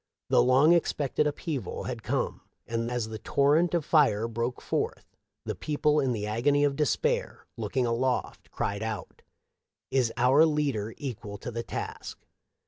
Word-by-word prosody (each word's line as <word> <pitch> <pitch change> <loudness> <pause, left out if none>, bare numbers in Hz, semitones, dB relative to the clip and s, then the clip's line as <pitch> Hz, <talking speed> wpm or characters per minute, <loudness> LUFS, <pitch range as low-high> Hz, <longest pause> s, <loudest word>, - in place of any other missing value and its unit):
The - - +5
long 135 +6 +5
expected 150 -3 +1
upheaval 145 -2 -4
had - - -5
coine, - - -2 0.3
and 115 0 -2
as 120 -3 -2
the 110 -1 -6
torrent 150 - +2
of 165 -4 0
fire 115 -9 +3
broke 115 +2 -3
forth - - -2 0.4
the - - -2
people 150 0 +1
in 135 -3 +1
the 105 -3 -2
agony 135 +7 +2
of 140 -1 +2
despair 475 - 0
looking 130 -3 -1
aloft 125 +2 -1
cried 100 +1 -3
out, 110 -3 -5 0.4
" - - -58 0.3
Is 130 -3 +2
our 130 +5 +5
leader 140 -9 0
equal 105 -7 -6
to 120 - -6
the 115 0 -3
task?" - - -6
130 Hz, 155 wpm, -28 LUFS, 115-150 Hz, 0.4 s, The